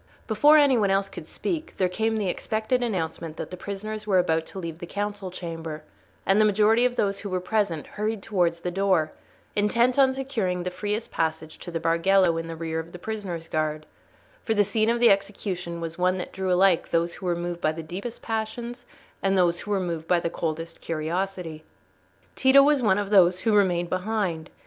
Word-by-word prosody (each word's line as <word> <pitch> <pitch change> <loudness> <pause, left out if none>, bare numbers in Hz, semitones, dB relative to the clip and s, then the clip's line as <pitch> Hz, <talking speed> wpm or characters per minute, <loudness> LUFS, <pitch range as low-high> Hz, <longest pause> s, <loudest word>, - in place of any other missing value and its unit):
Before 290 +8 +5
any 280 -5 +5
one 200 -2 +2
else 195 0 +1
could - - -9
speak, 330 -3 -4
there 185 - +2
came 220 +4 -1
the 205 -3 -1
expected 220 +6 -1
announcement 165 -7 -3
that - - -6
the - - -5
prisoners 210 +3 -6
were 195 -3 +3
about 160 -3 +1
to - - -10
leave 165 -3 -5
the 175 - -7
council 205 0 -4
chamber; 165 -3 -6 0.4
and 195 +2 +4
the - - +5
majority 215 +3 +4
of 250 -1 +1
those 200 -3 0
who 205 - -6
were 185 -1 -1
present 180 -5 -1
hurried 210 -1 -3
towards 175 -5 0
the 180 - -2
door, 185 -4 +1 0.4
intent 235 +5 +2
on 265 -1 +6
securing 230 -10 -2
the 180 - -3
freest 210 +4 -3
passage 160 -1 -2
to - - -8
the 165 -1 -3
Bargello 170 +2 +3
in 165 - -5
the 165 - -5
rear 160 0 -3
of 160 +1 -8
the - - -7
prisoners' 180 -4 -5
guard; 155 -1 -2 0.6
for 225 - 0
the 205 - +5
scene 215 +2 +1
of 235 +1 +1
the 240 - +6
execution 195 -3 -2
was 165 +1 -6
one 185 +1 +2
that 180 - -6
drew 190 -1 -2
alike 180 -1 +3
those 170 0 +1
who 185 - -6
were 175 - +1
moved 175 0 -4
by 155 - +2
the 160 +1 -6
deepest 195 +9 -7
passions 235 +2 -4 0.3
and 195 0 +2
those 175 -2 +3
who - - -8
were 200 -1 +1
moved 165 -3 -3
by 180 - +3
the 170 - -3
coldest 165 0 -4
curiosity. 165 0 -3 0.7
Tito 270 +1 +6
was 290 -1 +3
one 210 -4 +3
of 205 0 -2
those 180 -2 +5
who 225 - +2
remained 175 -4 +2
behind. 185 -4 -1
190 Hz, 205 wpm, -25 LUFS, 170-215 Hz, 0.7 s, on